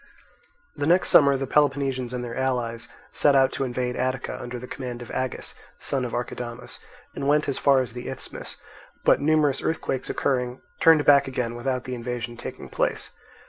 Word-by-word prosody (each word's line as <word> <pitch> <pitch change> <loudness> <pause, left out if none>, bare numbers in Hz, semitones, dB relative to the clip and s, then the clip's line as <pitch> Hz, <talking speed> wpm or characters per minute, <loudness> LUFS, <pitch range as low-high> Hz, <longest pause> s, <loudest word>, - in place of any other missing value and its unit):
The 145 - -2
next 175 +3 +4
summer 140 -2 +6
the 135 - -2
Peloponnesians 135 -3 +1
and 125 -1 -3
their 120 -1 -5
allies 120 -3 -1 0.2
set 145 -1 +4
out 135 -1 +5
to 135 - -2
invade 125 -1 -2
Attica 130 0 -2
under 125 0 -5
the 125 - -7
command 125 -2 -6
of - - -10
Agis, 130 -1 -3 0.2
son 135 -2 -1
of 120 - -5
Archidamus, 120 0 -5 0.3
and 140 - -3
went 150 +1 +3
as 140 - -1
far 135 -2 +4
as 125 -3 -5
the 125 0 -6
Isthmus, - - -7 0.5
but - - +5
numerous 150 -2 +2
earthquakes 145 -5 -2
occurring, 125 -2 -1 0.2
turned 160 -2 +6
back 140 -1 +6
again 125 -3 -2
without 125 +1 -2
the 130 - -5
invasion 120 -1 -4
taking - - -8
place. - - -2
130 Hz, 180 wpm, -25 LUFS, 125-140 Hz, 0.5 s, summer